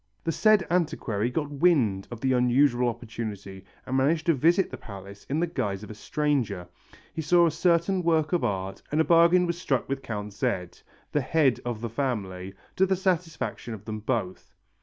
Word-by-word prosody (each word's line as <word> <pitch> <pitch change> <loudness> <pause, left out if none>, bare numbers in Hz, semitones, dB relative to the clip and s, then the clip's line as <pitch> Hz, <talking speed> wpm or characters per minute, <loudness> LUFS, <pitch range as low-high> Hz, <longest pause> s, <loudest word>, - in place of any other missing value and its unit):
The 165 - 0
said 215 +2 +4
antiquary 125 - 0
got 145 +3 -3
wind 135 - +2
of 120 -2 -8
the 130 -1 +2
unusual 125 0 +3
opportunity 110 -5 -7 0.2
and 130 - -3
managed 155 +5 +2
to 170 - +4
visit 170 +7 +2
the 130 - -6
palace 100 -2 -11
in 145 +3 0
the 170 - +2
guise 105 - -3
of 105 - -9
a - - -6
stranger. 130 -7 -1 0.5
He 160 - -3
saw 170 +3 +4
a 165 - +2
certain 175 +3 +2
work 160 -1 +1
of 175 - +1
art 95 -1 -2
and 150 - +1
a - - +5
bargain 170 +2 +5
was 170 0 -3
struck 135 -8 0
with 135 0 -3
Count 105 -3 -5
Z., 90 -3 -1 0.4
the 150 - +1
head 140 -1 +2
of 120 -3 -4
the 120 - -2
family, 100 -7 -3 0.2
to 190 - +4
the 190 - +2
satisfaction 175 - -2
of 105 -1 -14
them 110 -1 -4
both. 110 -5 -3
130 Hz, 190 wpm, -26 LUFS, 105-165 Hz, 0.5 s, a